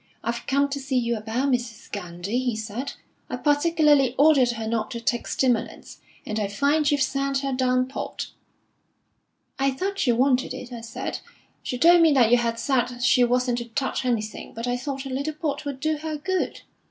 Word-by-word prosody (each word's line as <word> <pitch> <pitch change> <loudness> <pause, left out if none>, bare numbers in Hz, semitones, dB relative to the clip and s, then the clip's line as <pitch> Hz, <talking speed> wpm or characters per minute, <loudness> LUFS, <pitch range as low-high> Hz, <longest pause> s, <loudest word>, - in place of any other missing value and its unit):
'I've 235 +1 -3
come 280 +1 +2
to 280 0 -3
see 270 -1 -1
you 235 -1 +1
about 230 +5 -1
Mrs. 240 -3 -3
Gandy,' 180 +3 -3
he 250 -3 -1
said. 220 +5 -5 0.4
'I - - -2
particularly 295 -3 +3
ordered 285 -4 +5
her 225 -1 -5
not 220 -1 -1
to 235 - -5
take 240 0 -1
stimulants, 250 -4 -1 0.3
and 215 0 -2
I 205 - 0
find 285 +8 +2
you've 290 -2 +2
sent 275 0 -1
her 275 -1 -2
down 255 0 +2
port.' 270 - -5 1.3
'I 275 0 +3
thought 390 +8 -3
she 250 - +3
wanted 255 +2 +2
it,' 250 0 -8
I 235 - -6
said. 230 0 -5 0.4
'She 250 - -4
told 340 +5 +6
me 325 -1 +6
that 240 -4 +4
you 245 - +7
had 230 -1 -1
said 245 0 0
she 245 0 +5
wasn't 245 0 +1
to 235 - -5
touch 265 +4 -2
anything, 225 -4 -3
but 230 +1 -4
I 245 0 0
thought 270 +2 -4
a - - -5
little 280 +4 -3
port 300 -2 -3
would 280 -2 -4
do 310 +2 0
her 310 0 -4
good.' 375 +4 -2
255 Hz, 195 wpm, -25 LUFS, 235-280 Hz, 1.3 s, you